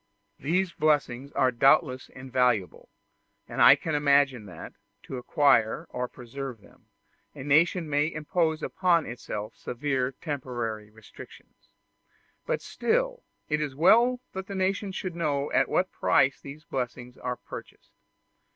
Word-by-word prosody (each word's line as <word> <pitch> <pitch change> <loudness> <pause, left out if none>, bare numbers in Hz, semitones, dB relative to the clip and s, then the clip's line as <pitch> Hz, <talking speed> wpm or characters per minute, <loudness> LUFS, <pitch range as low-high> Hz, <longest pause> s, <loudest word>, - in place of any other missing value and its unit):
These 175 +5 0
blessings 140 -4 0
are 130 - +3
doubtless 130 +1 +3
invaluable, 125 -6 -1 0.6
and - - -3
I - - +9
can 160 - -4
imagine 140 -6 +3
that, 90 -4 -10 0.3
to 130 - -6
acquire 125 -3 +2
or 125 0 -3
to - - -32
preserve 125 0 -7
them, - - -22 0.5
a - - -7
nation 160 +4 +3
may 150 +2 +1
impose 160 +1 -1
upon 175 -4 +2
itself 110 -2 -6
severe 130 0 -2
temporary 120 -7 -5
restrictions: 110 0 -15 0.8
but - - -1
still - - -1 0.3
it 150 0 0
is 145 -3 -3
well 235 - +5
that 190 0 -6
the 200 - -6
nation 195 +1 -1
should 185 -2 -5
know 145 -4 -1
at 135 +1 +2
what 185 +1 +1
price 135 +1 +2
these 145 +3 -10
blessings 125 -2 -5
are 125 0 -3
purchased. - - -11
140 Hz, 135 wpm, -27 LUFS, 125-165 Hz, 0.8 s, I